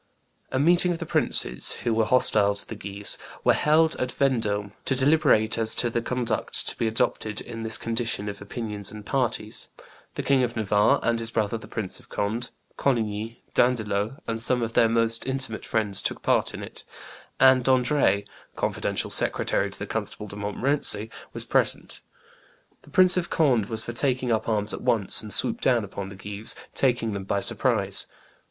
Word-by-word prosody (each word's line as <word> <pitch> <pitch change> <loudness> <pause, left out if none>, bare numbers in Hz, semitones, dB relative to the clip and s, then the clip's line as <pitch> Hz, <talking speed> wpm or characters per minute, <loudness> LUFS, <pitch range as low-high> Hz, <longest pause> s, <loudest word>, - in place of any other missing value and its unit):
A 130 - -1
meeting 175 +5 +4
of 170 - -2
the - - -6
princes 60 - +1
who 120 - 0
were 110 0 +2
hostile 105 -4 +4
to 100 - -3
the - - -6
Guises 100 -1 -2 0.2
were - - +4
held 155 +1 +3
at 125 0 -2
Vendome 105 -7 0
to 135 - +1
deliberate 130 -6 +3
as 110 -1 +5
to 120 - 0
the 120 - -1
conduct 125 0 0
to - - -4
be 115 - -1
adopted 110 -1 -1
in 115 -1 -8
this 110 0 -1
condition 115 -2 -2
of 100 0 -6
opinions 105 -1 -5
and 105 -1 -10
parties; 115 -5 -2 0.5
the - - -3
King 135 -2 +3
of 120 -2 -1
Navarre 105 -2 +2
and 115 0 +1
his 115 0 -3
brother 110 -1 -1
the 115 - -8
Prince 105 -5 -5
of - - -20
Conde, 110 +4 -2 0.3
Coligny, 115 -3 -2
D'Andelot, 110 -1 0
and 115 -1 -3
some 120 +1 0
of 115 0 -4
their 115 - +4
most 115 +1 0
intimate 130 -4 -2
friends 105 -3 +1
took - - -3
part - - +1
in - - -7
it; - - -4 0.6
and 130 -1 +5
D'Ardres, 130 -4 +2 0.3
confidential - - -2
secretary - - 0
to - - -11
the - - -5
Constable 105 - -5
de 100 - -7
Montmorency, 110 +1 0 0.2
was - - +1
present. - - +1 0.8
The - - -19
Prince 185 +4 +5
of 175 - -1
Conde 125 -10 +2
was 110 -1 +4
for 120 - -5
taking 130 0 0
up 110 0 0
arms 105 -1 +1
at - - -5
once 105 -4 +4
and 105 - -7
swoop 230 - +2
down 120 -3 +2
upon 100 -1 -7
the 100 - -10
Guises, 100 +3 -2 0.2
taking 120 -4 0
them 100 -1 -5
by 100 +1 -1
surprise. - - +2
115 Hz, 185 wpm, -25 LUFS, 105-125 Hz, 0.8 s, as